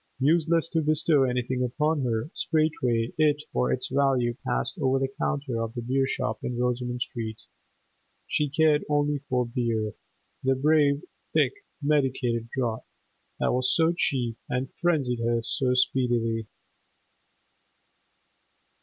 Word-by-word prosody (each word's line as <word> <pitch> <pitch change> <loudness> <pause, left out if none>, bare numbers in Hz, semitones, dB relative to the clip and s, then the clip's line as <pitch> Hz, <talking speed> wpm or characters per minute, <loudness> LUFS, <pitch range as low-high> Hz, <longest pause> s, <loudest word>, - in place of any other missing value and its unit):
Useless 165 +4 +2
to 165 -2 +1
bestow 155 -2 +3
anything 125 0 -1
upon 150 +5 0
her; 115 +5 -1
straightway 125 -8 0
it 150 -1 +3
or 65 0 +1
its 65 - 0
value 130 -3 +2
passed 130 +8 -1
over 135 -2 +2
the 135 0 -2
counter 135 -6 -1
of 115 +1 -4
the 120 - -3
beer 135 +2 +1
shop - - -2
in 120 -1 -3
Rosoman 125 0 -1
Street. 115 -3 -5 0.8
She 150 -1 0
cared 150 +1 +3
only 145 0 +1
for 125 -1 +1
beer, 115 -3 -1 0.5
the 135 0 +3
brave, 145 0 +3 0.3
thick, - - +3 0.3
medicated 130 -5 +1
draught, 120 -4 -2 0.5
that - - +1
was 130 +1 +2
so 165 0 +3
cheap 120 -8 0
and 130 +1 -2
frenzied 145 -9 +1
her 115 0 0
so 125 +1 0
speedily. 120 -3 +1
130 Hz, 130 wpm, -26 LUFS, 120-150 Hz, 0.8 s, bestow